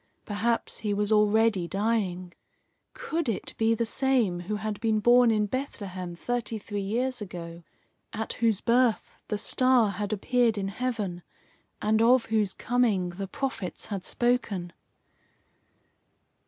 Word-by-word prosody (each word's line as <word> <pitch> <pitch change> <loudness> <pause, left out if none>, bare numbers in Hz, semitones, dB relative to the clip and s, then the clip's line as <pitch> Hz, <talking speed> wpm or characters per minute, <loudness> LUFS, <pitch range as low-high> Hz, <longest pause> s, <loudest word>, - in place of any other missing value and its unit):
Perhaps 225 +3 -1
he 210 -2 -1
was 205 +1 0
already 210 -3 +3
dying. 195 -3 -1 0.6
Could 335 - -2
it 220 - -3
be 225 0 +3
the 230 - 0
same 240 -7 +1
who 190 +5 -3
had 210 -1 -4
been 220 -2 +1
born 240 +2 +5
in 215 -2 +2
Bethlehem 195 -7 -5
thirty 235 +3 -3
three 205 -1 -5
years 245 +5 -1
ago, 170 -3 -7 0.5
at 220 0 -4
whose 225 -4 +2
birth 240 -1 +2
the 210 - -1
star 250 -1 +3
had 200 +1 -4
appeared 230 +2 +1
in 195 -1 -2
heaven, 205 -6 -3 0.6
and 220 +1 +3
of 240 +1 +5
whose 210 -3 +1
coming 225 -7 +1
the 195 +3 -6
prophets 235 -5 -4
had 195 -2 -4
spoken? 210 -9 0
215 Hz, 135 wpm, -27 LUFS, 195-240 Hz, 0.6 s, born